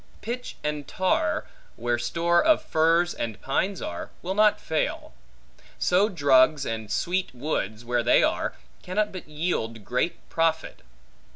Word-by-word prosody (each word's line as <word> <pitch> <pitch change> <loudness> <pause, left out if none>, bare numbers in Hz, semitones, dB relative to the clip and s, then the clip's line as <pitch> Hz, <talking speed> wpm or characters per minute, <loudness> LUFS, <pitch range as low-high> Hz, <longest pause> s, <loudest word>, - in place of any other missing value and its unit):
Pitch 245 +3 -5
and 150 -1 -3
tar, 185 - 0 0.3
where 120 +1 -1
store 170 +8 +2
of 315 -1 +4
firs 165 +2 +2
and 110 -3 -4
pines 180 +8 -1
are, 85 - -5
will 185 - -2
not 210 +1 +4
fail. 160 -1 -2 0.6
So 190 +4 +3
drugs 145 -4 +4
and 110 -2 -4
sweet 175 - -1
woods, 120 -5 -3
where 120 0 +1
they 120 - +4
are, - - 0 0.3
cannot 210 +3 -1
but 185 -5 -9
yield 115 - -2
great 125 +8 -2
profit. 165 -1 -1
155 Hz, 135 wpm, -26 LUFS, 120-180 Hz, 0.6 s, of